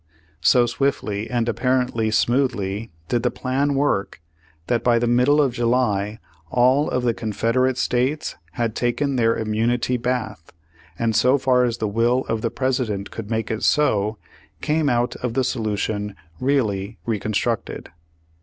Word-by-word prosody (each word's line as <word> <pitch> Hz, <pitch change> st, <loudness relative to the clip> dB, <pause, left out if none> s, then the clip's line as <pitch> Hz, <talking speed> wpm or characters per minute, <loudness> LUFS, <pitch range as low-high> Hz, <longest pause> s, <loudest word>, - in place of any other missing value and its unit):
So 120 Hz, +8 st, +5 dB
swiftly 120 Hz, -4 st, -1 dB
and 120 Hz, -2 st, 0 dB
ap -, -, -1 dB
parently 125 Hz, -4 st, +1 dB
smoothly 115 Hz, -3 st, 0 dB, 0.2 s
did 120 Hz, +4 st, 0 dB
the 125 Hz, -, +1 dB
plan 140 Hz, +3 st, -1 dB
work 135 Hz, -8 st, 0 dB, 0.5 s
that 120 Hz, +3 st, 0 dB
by 120 Hz, -1 st, +4 dB
the 120 Hz, -, +1 dB
middle 125 Hz, +5 st, +3 dB
of 135 Hz, -4 st, +2 dB
July 115 Hz, -4 st, 0 dB, 0.3 s
all 130 Hz, -, +3 dB
of 125 Hz, -, -1 dB
the 120 Hz, -1 st, +2 dB
Confederate 115 Hz, +4 st, 0 dB
States 130 Hz, +5 st, 0 dB, 0.2 s
had 115 Hz, +1 st, -2 dB
taken 135 Hz, +3 st, 0 dB
their 115 Hz, -2 st, +2 dB
immunity 115 Hz, +3 st, 0 dB
bath, 115 Hz, -8 st, -3 dB, 0.4 s
and 115 Hz, +1 st, 0 dB
so 125 Hz, +5 st, +4 dB
far 130 Hz, -2 st, +3 dB
as 120 Hz, -1 st, -1 dB
the 110 Hz, -, -1 dB
will 120 Hz, +5 st, +1 dB
of 110 Hz, -1 st, -2 dB
the 115 Hz, -, 0 dB
President 120 Hz, -5 st, -2 dB
could 110 Hz, -2 st, -7 dB
make 110 Hz, -1 st, -2 dB
it 110 Hz, -, -3 dB
so, 110 Hz, -7 st, +2 dB, 0.4 s
came 150 Hz, -1 st, +1 dB
out 120 Hz, 0 st, 0 dB
of 125 Hz, -2 st, -4 dB
the 130 Hz, -, +2 dB
solution 105 Hz, -4 st, -2 dB, 0.3 s
reallj' 110 Hz, -6 st, 0 dB
Reconstructed. 110 Hz, +1 st, -2 dB
120 Hz, 150 wpm, -22 LUFS, 110-130 Hz, 0.5 s, So